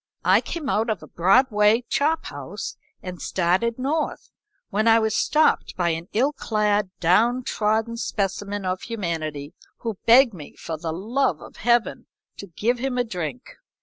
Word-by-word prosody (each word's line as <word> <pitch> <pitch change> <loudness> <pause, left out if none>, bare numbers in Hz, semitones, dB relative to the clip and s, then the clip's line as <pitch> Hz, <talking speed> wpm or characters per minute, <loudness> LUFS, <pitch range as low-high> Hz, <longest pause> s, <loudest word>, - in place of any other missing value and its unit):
I - - +5
came 325 -5 -5
out 225 -2 0
of 215 - -2
a - - -11
Broadway 210 +4 +3
chop 310 +4 0
house - - -6 0.3
and 180 -2 -7
started 190 +6 0
north, 295 +4 -2 0.4
when 215 +3 +1
I 225 0 +7
was 220 -1 +1
stopped 310 +1 +2
by 175 -2 +1
an 165 +1 -3
ill 265 +7 +1
clad, 210 -5 0
down 230 +9 +3
trodden 220 +1 0
specimen 200 -1 -3
of 185 0 -2
humanity, 160 -9 -4 0.3
who 225 -5 -4
begged 240 0 +7
me, 155 -6 -11
for 165 - -5
the 160 +1 -4
love 230 +11 -1
of - - -13
Heaven 240 -1 +1 0.3
to 200 - -8
give 230 +8 -1
him 260 0 -2
a 245 - +2
drink. 160 - -5
215 Hz, 160 wpm, -23 LUFS, 180-240 Hz, 0.4 s, I